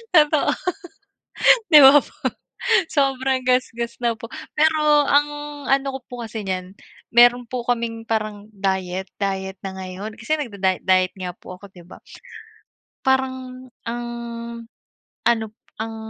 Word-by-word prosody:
Totoo, 300 -2 +4 1.2
di 300 - +11
ba 275 +1 +9
po 290 - +2 0.8
sobrang 270 -2 +1
gasgas 235 -2 0
na 235 -1 +1
po, 225 +1 -10 0.2
pero 300 -1 +3
ang 290 +1 +4 0.4
ano 270 +1 +2
ko - - -17
po - - -15
kasi 220 -2 -6
niyan, 185 0 -4 0.3
meron 240 +1 +5
po 250 -2 -4
kaming 230 -2 -2
parang 215 -2 -2
diet 190 -1 -2
diet 190 -1 -3
na 190 - -4
ngayon 190 +3 -7
kasi 305 +8 -1
nagda-diet 200 -9 -2
diet 185 -1 +3
nga 180 -1 -5
po 185 +1 -11
ako 200 - -14
'di 175 - -13
ba? - - -11 1.0
Parang 260 -1 -1 0.2
ang 240 +1 -4 1.2
ano 230 -2 +3
p - - -44 0.3
ang 225 0 -4
235 Hz, 135 wpm, -22 LUFS, 195-265 Hz, 1.2 s, di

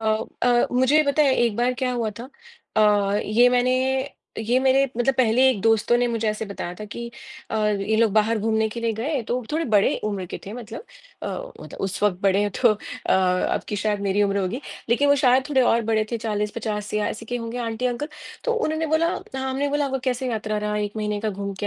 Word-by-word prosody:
अ 220 -1 +2 0.3
अ, 245 -1 +4
मुझे 260 +4 +3
ये 310 - +6
पता 290 +1 +2
है 275 -3 +4
एक 235 -4 +1
बार 245 +1 +1
क्या 250 0 -1
हुआ 235 -3 -1
था।, 240 +2 -8 0.5
अ 205 -1 +3
ये 235 +4 +4
मैंने 250 0 +2 0.7
ये 230 +3 +1
मेरे 265 +1 +4
मतलब 245 +2 +2
पहले 255 +1 +4
एक 255 -6 +1
दोस्तों 225 +2 +3
ने 245 - +2
मुझे 230 -2 -1
ऐसे 215 +1 -2
बताया 185 -3 -6
था 210 - -8
कि 235 +3 -7 0.4
अ, - - -1
ये 210 +1 0
लोग 225 -2 +3
बाहर 220 +2 +2
घूमने 220 +1 +1
के 235 +2 -6
लिए 230 -1 0
गए 260 +6 -2
तो 245 +3 -2
थोड़े 325 +2 0
बड़े 200 - +4
उम्र 200 -3 -2
के - - -6
थे 200 - -6
मतलब 230 - -8 0.4
अ, - - -3
उत - - -7
उस 195 0 -4
वक़्त 200 -4 +2
बड़े 200 +1 +3
तो 245 - +6
अ, 210 - -7 0.4
अब 185 -1 +1
की 210 - -2
शायद 205 0 -1
मेरी 200 +1 +1
उम्र 200 0 +1
होगी। 200 +8 -3 0.3
लेकिन 265 +5 +3
वो 285 - +5
शायद 260 0 +3
थोड़े 275 -3 +3
और 235 -1 +3
बड़े 220 -1 +2
थे 235 - -1
40-50 210 -1 -3
या 210 0 +1
ऐसे 220 - -6
के 245 - -2
होंगे 230 0 -5
आंटी-अंकल। 245 +4 -2 0.4
तो 485 - +1
उन्होंने 320 -9 -1
बोला 315 +2 +2 0.3
हमने 265 +2 -1
बोला 290 0 +1
आपका 270 -1 -2
कैसे 255 0 -1
यात्रा 215 -1 -2
रहा, 210 0 -2
1 210 0 -3
महीने 210 -1 -2
का 220 0 -1
घूम 200 0 -4
के 205 - -1
225 Hz, 225 wpm, -23 LUFS, 210-255 Hz, 0.7 s, ये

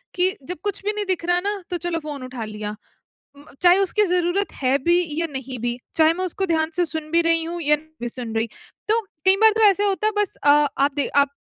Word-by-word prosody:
कि 370 +2 +3
जब 360 - -4
कुछ 405 -2 -2
भी 420 - +2
नहीं 420 -1 -3
दिख 370 -3 -1
रहा 350 0 +2
ना, 405 +2 -3
तो 355 - -1
चलो 345 -1 -3
फ़ोन 295 -4 -7
उठा 255 -2 -6
लिया। 210 0 -6 0.6
उम, 285 +1 -17 0.2
चाहे 355 +1 +6
उसकी 395 +2 +2
ज़रूरत 360 +2 0
है 260 +1 +2
भी 345 +2 +4 0.2
या 335 - 0
नहीं 265 -1 -5
भी, 240 +1 -2 0.2
चाहे 320 0 +4
मैं 370 +2 -3
उसको 385 +2 -2
ध्यान 320 -3 0
से 355 - +2
सुन 315 -1 -5
भी 335 +1 +4
रही 330 0 +2
हूँ 340 +1 -5
या 300 -1 +4
नहीं 305 +1 -14
भी 240 - -3
सुन 235 -2 -6
रही। 225 +1 0 0.4
तो 440 +2 +3 0.3
कई 380 0 +7
बार 445 0 +7
तो - - +1
ऐसा 400 +1 0
होता 400 +1 +1
है, - - +2
बस 415 -2 0
अ, 290 - +4
आप 285 -1 +3
दे 285 - 0
आप 280 0 +4
335 Hz, 250 wpm, -22 LUFS, 285-370 Hz, 0.6 s, कई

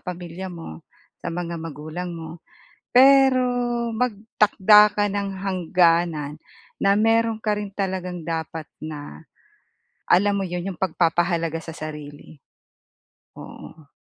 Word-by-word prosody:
pamilya 180 0 -7
mo, 165 - -9 0.4
sa - - -5
mga 170 0 -4
magulang 160 +3 -6
mo, 165 0 -9 0.6
pero 265 0 +6 0.5
magtakda 210 -2 +4
ka 205 - +1
ng 200 -1 -2
hangganan 170 -5 +1 0.4
na 200 0 +3
meron 225 +1 +2
ka 210 -1 0
rin 205 - -4
talagang 185 -3 -3
dapat 160 -1 -4 0.2
na, 155 0 -8 0.8
alam 200 +3 +4
mo 195 - -1
yun, 180 +2 -4
yung - - -18
pagpapahalaga 170 -2 0
sa 165 0 -9
sarili. 150 -1 -9 1.0
Oo. 155 -3 -12
175 Hz, 110 wpm, -23 LUFS, 160-205 Hz, 1.0 s, pero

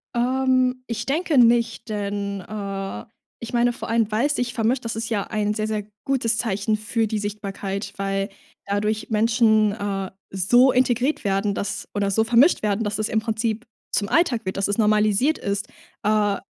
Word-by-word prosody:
Ähm, 255 +1 +2
ich 230 0 -3
denke 310 +2 0
nicht, 235 -1 +3
denn 200 -1 -3
äh, 195 - -5 0.4
ich 230 - -6
meine 240 0 +3
vor - - -7
allem, 225 -2 +2
weil's 265 +8 +1
sich 245 -1 -1
vermischt, 235 +2 0
das 225 - -3
ist 225 0 -4
ja 205 -4 -1
ein 210 -1 -1
sehr, 215 0 -2
sehr 215 -1 -2 0.2
gutes 240 -5 +1
Zeichen 215 -1 0
für 220 +2 -1
die 215 0 -2
Sichtbarkeit, 200 -1 -4
weil 195 0 -1 0.4
dadurch 210 +2 -1
Menschen, 220 -1 +3
äh, 200 -2 -3 0.2
so 240 +8 +4
integriert 255 +3 +1
werden, 200 +1 0
dass 205 +1 -4
oder 200 -1 0
so 220 +3 +3
vermischt 240 +8 +4
werden, 210 +1 +1
dass 205 -1 -2
es 215 - 0
im 220 - +2
Prinzip 220 +1 -2 0.3
zum 205 - 0
Alltag 275 -9 +2
wird, 185 - -3
dass 195 - +1
es 205 - -1
normalisiert 215 +6 +3
ist, 200 +2 -3 0.4
äh, 210 -1 +2
215 Hz, 175 wpm, -23 LUFS, 205-235 Hz, 0.4 s, so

